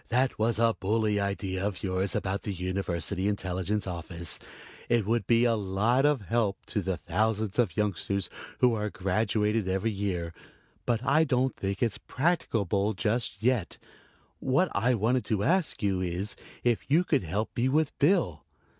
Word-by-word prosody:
"That 125 Hz, +1 st, +1 dB
was 115 Hz, +1 st, +2 dB
a 115 Hz, -1 st, +3 dB
bully 105 Hz, +1 st, +1 dB
idea 100 Hz, -1 st, -2 dB
of 100 Hz, -2 st, -3 dB
yours 95 Hz, 0 st, 0 dB
about 95 Hz, +1 st, -1 dB
the 105 Hz, -, -3 dB
University 95 Hz, 0 st, -1 dB
Intelligence 95 Hz, 0 st, -1 dB
Office. 85 Hz, -2 st, -4 dB, 0.5 s
It 120 Hz, -3 st, +3 dB
would 115 Hz, -1 st, 0 dB
be 120 Hz, 0 st, +4 dB
a 120 Hz, -, +4 dB
lot 110 Hz, +6 st, +2 dB
of 145 Hz, -5 st, +2 dB
help 105 Hz, -1 st, -1 dB
to 105 Hz, -, +1 dB
the 95 Hz, -1 st, -2 dB
thousands 110 Hz, +2 st, -1 dB
of 100 Hz, -9 st, +1 dB
youngsters 100 Hz, -1 st, 0 dB, 0.3 s
who 125 Hz, -2 st, +5 dB
are 105 Hz, -1 st, -1 dB
graduated 105 Hz, +2 st, 0 dB
every 95 Hz, +4 st, 0 dB
year 95 Hz, -5 st, -2 dB, 0.5 s
but 120 Hz, 0 st, +1 dB
I 155 Hz, +4 st, +4 dB
don't 130 Hz, -3 st, +1 dB
think 100 Hz, +4 st, -2 dB
it's 115 Hz, -3 st, 0 dB
practicable 110 Hz, -, 0 dB
just 110 Hz, 0 st, -1 dB
yet. 120 Hz, -9 st, +1 dB, 0.6 s
What 140 Hz, +8 st, +2 dB
I 120 Hz, +5 st, +2 dB
wanted 120 Hz, +4 st, +1 dB
to 105 Hz, -3 st, 0 dB
ask 175 Hz, -, +1 dB
you 95 Hz, -2 st, +1 dB
is 90 Hz, +3 st, -2 dB, 0.3 s
if 120 Hz, +1 st, 0 dB
you 160 Hz, +5 st, +4 dB
could 150 Hz, -6 st, +1 dB
help 95 Hz, +6 st, -3 dB
me 125 Hz, +2 st, +1 dB
with 150 Hz, +1 st, +1 dB
Bill?" 145 Hz, -, +2 dB
105 Hz, 165 wpm, -28 LUFS, 95-120 Hz, 0.6 s, who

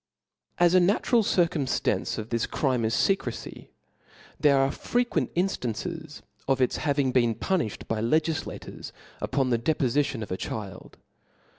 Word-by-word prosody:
ch^'/i. 175 Hz, -, +5 dB
As 175 Hz, -, +4 dB
a 185 Hz, -, +7 dB
natural 205 Hz, +6 st, +3 dB
circunnftance 170 Hz, -8 st, 0 dB
of 110 Hz, 0 st, -5 dB
this 115 Hz, -1 st, 0 dB
crime 130 Hz, -5 st, 0 dB
is 110 Hz, -1 st, +1 dB
fecrecy, 160 Hz, -, -1 dB, 0.7 s
there 145 Hz, -2 st, +5 dB
are 135 Hz, 0 st, +3 dB
frequent 245 Hz, 0 st, -1 dB
inftances 160 Hz, -, -3 dB, 0.2 s
of 135 Hz, -1 st, +2 dB
its 125 Hz, -, +1 dB
having 140 Hz, -3 st, +1 dB
been 120 Hz, -3 st, +2 dB
pu 190 Hz, -, 0 dB
nifhed 110 Hz, -, -4 dB
by 110 Hz, -1 st, -1 dB
legiflators 155 Hz, +7 st, -2 dB, 0.3 s
upon 135 Hz, -2 st, 0 dB
the 120 Hz, -, +2 dB
depofitionof 130 Hz, -4 st, 0 dB
achild. 95 Hz, +1 st, -6 dB
135 Hz, 135 wpm, -27 LUFS, 115-170 Hz, 0.7 s, a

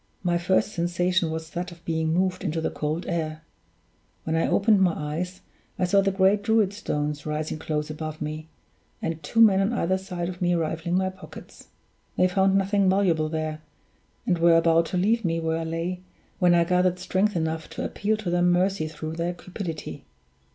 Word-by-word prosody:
My 175 Hz, -1 st, +1 dB
first 185 Hz, +4 st, +1 dB
sensation 175 Hz, 0 st, 0 dB
was 160 Hz, 0 st, -5 dB
that 175 Hz, 0 st, -4 dB
of 170 Hz, 0 st, -15 dB
being 160 Hz, -1 st, 0 dB
moved 185 Hz, +2 st, 0 dB
into 160 Hz, +2 st, -1 dB
the 160 Hz, -, -1 dB
cold 155 Hz, +3 st, -3 dB
air; 160 Hz, -3 st, -3 dB, 0.8 s
when 160 Hz, -, -1 dB
I 165 Hz, -, +2 dB
opened 205 Hz, -1 st, +3 dB
my 180 Hz, -3 st, +4 dB
eyes 165 Hz, +5 st, -4 dB, 0.4 s
I 185 Hz, -, -1 dB
saw 195 Hz, +2 st, +4 dB
the 195 Hz, -, +1 dB
great 195 Hz, +1 st, +3 dB
Druid 210 Hz, -2 st, +2 dB
stones 150 Hz, -7 st, -3 dB
rising 155 Hz, +1 st, -3 dB
close 150 Hz, -1 st, -3 dB
above 155 Hz, 0 st, -6 dB
me, 155 Hz, +1 st, -5 dB, 0.5 s
and 165 Hz, -1 st, -3 dB
two 155 Hz, +9 st, -2 dB
men 200 Hz, -4 st, +7 dB
on 200 Hz, +5 st, +1 dB
either 190 Hz, -4 st, 0 dB
side 180 Hz, -2 st, -4 dB
of 180 Hz, 0 st, -7 dB
me 175 Hz, 0 st, +2 dB
rifling 165 Hz, +1 st, -1 dB
my 190 Hz, 0 st, 0 dB
pockets. 190 Hz, -, -13 dB, 0.5 s
They 185 Hz, -, +4 dB
found 190 Hz, +1 st, +2 dB
nothing 195 Hz, 0 st, +2 dB
valuable 175 Hz, -5 st, +2 dB
there, 155 Hz, -1 st, -3 dB, 0.6 s
and 175 Hz, -3 st, +1 dB
were 170 Hz, 0 st, +6 dB
about 165 Hz, 0 st, +3 dB
to 180 Hz, -, -2 dB
leave 220 Hz, +5 st, +2 dB
me 165 Hz, -2 st, 0 dB
where 160 Hz, 0 st, -1 dB
I 165 Hz, -, -3 dB
lay, 165 Hz, +3 st, -3 dB, 0.4 s
when 175 Hz, -1 st, +5 dB
I 170 Hz, -, +5 dB
gathered 180 Hz, +1 st, +2 dB
strength 190 Hz, +3 st, 0 dB
enough 160 Hz, -1 st, -2 dB
to -, -, -5 dB
appeal 215 Hz, +2 st, -1 dB
to 205 Hz, -5 st, -3 dB
their 175 Hz, 0 st, +2 dB
mercy 180 Hz, -1 st, +2 dB
through 155 Hz, +1 st, -6 dB
their 175 Hz, +1 st, -2 dB
cupidity. 175 Hz, -3 st, -6 dB
175 Hz, 190 wpm, -25 LUFS, 160-190 Hz, 0.8 s, men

